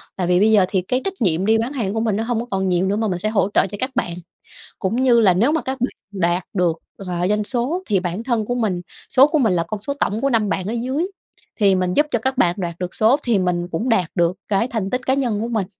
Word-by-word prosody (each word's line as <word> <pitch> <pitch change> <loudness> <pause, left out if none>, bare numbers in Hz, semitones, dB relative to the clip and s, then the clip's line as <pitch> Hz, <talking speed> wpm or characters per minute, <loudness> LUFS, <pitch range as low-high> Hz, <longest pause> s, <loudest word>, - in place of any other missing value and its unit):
Tại 180 -2 -2
vì 180 0 +3
bây 215 +3 +4
giờ 205 -4 +5
thì 190 - +1
cái 250 +8 -1
trách 390 - -1
nhiệm 180 -2 +2
đi 220 +1 +4
bán 235 +5 -2
hàng 210 -7 -2
của 225 - -1
mình 220 -3 0
nó 220 - -1
hông 235 -1 -1
có - - -6
còn 190 -1 0
nhiều 180 +1 +1
nữa, 200 - +1
mà 220 +1 0
mình 180 -3 -2
sẽ 215 +4 -1
hỗ 210 -2 +1
trợ - - +4
cho 205 - -7
các 255 +1 -1
bạn, 210 -8 -1 0.7
cũng 195 +5 -1
như 245 -3 +5
là 190 -5 +5
nếu 235 +11 +2
mà 320 - 0
các 265 0 -4
bạn 250 - 0 0.3
đạt 175 +1 +1
được, 175 -4 +1 0.2
gọi 180 -3 -5
là, 180 - +1
doanh 210 +1 +1
số 265 - -2
thì 200 -3 +1
bản 180 +4 -3
thân 235 -4 0
của 245 - -1
mình 215 -7 -1 0.3
số 270 +1 +7
của 310 0 +1
mình 225 -8 +3
là 170 -2 +1
con 210 +1 -6
số 280 +6 -3
tổng 210 +2 0
của 275 - +1
5 220 -4 +2
bạn 190 -2 -2
ở 215 - -2
dưới, 260 +8 -1 0.5
thì 195 -2 +5
mình 180 -1 0
giúp 295 - +3
cho 235 - +1
các 260 +3 -2
bạn 175 -7 +3
đoạt 170 -2 -4
được 180 -1 -5
số 225 +5 +4
thì 235 -4 +2
mình 175 -1 -1
cũng 200 +9 -2
đạt 190 -8 +2
được 175 -2 +2 0.2
cái 210 +4 +1
thành 220 -6 -3
tích 255 +1 -3
cá 260 - +3
nhân 240 -7 0
của 230 - -2
mình. 220 -5 -1
215 Hz, 295 wpm, -20 LUFS, 185-240 Hz, 0.7 s, số